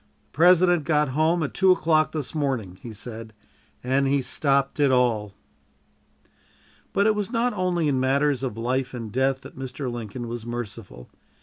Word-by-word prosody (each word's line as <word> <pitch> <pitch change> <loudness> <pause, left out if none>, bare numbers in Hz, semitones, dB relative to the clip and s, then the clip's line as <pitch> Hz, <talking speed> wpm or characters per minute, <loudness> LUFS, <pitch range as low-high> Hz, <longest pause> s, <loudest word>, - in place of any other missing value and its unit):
"The - - -25
President 175 +1 +5
got 150 -1 +1
home 160 +5 +1
at 140 - -4
two 190 -1 +4
o'clock 155 -3 +2
this 150 -4 -4
morning," 130 - -2
he 120 - -8
said, 110 +1 -8 0.5
"and 135 +2 +1
he 140 +1 +2
stopped 140 +1 0
it 145 -1 +4
all." 115 -6 +1 1.6
But 200 - +2
it 215 - +4
was 210 +1 -3
not 245 0 +1
only 180 -4 0
in 135 -3 +1
matters 135 +1 +1
of 125 -5 -4
life 130 +3 -2
and 115 -3 -6
death 130 +2 0
that - - -12
Mr. 130 0 -5
Lincoln 120 +1 -6
was 120 -1 -5
merciful. 115 - -7
135 Hz, 170 wpm, -24 LUFS, 120-155 Hz, 1.6 s, President